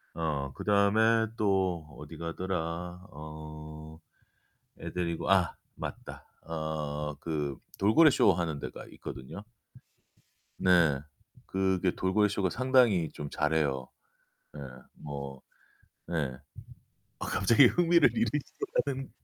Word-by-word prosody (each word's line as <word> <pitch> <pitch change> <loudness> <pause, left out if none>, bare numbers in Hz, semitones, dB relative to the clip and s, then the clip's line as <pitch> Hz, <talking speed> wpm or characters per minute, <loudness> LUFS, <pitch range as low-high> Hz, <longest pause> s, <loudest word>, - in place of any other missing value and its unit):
어, 75 -4 -2
그다음에 110 +2 +3
또 95 -6 +1
어디 75 +2 -9
가더라. 85 +1 -4
어. 75 +1 -9 0.8
애 - - -6
데리고. 85 -1 -2
아, 95 -3 +3 0.2
맞다. - - -7 0.2
어, 75 -2 -3
그 75 -4 -2 0.2
돌고래 140 +11 +6
쇼 100 - +5
하는 85 -5 -2
데가 - - -7
있거든요. 65 +10 -8 1.2
네. 85 -6 +4 0.5
그게 95 -1 +1
돌고래 105 +3 +2
쇼가 100 -2 0
상당히 120 - +3
좀 75 - -6
잘해요. 75 -4 0 0.7
네, 75 - -9 0.3
뭐. 70 -2 -7 0.7
네. 75 -6 -1 0.9
아, - - -4
갑자기 115 +7 +5
흥미를 170 +4 +5
잃으셔 225 -10 +1 0.4
가는. 135 -1 -4
85 Hz, 195 characters per minute, -30 LUFS, 75-100 Hz, 1.2 s, 돌고래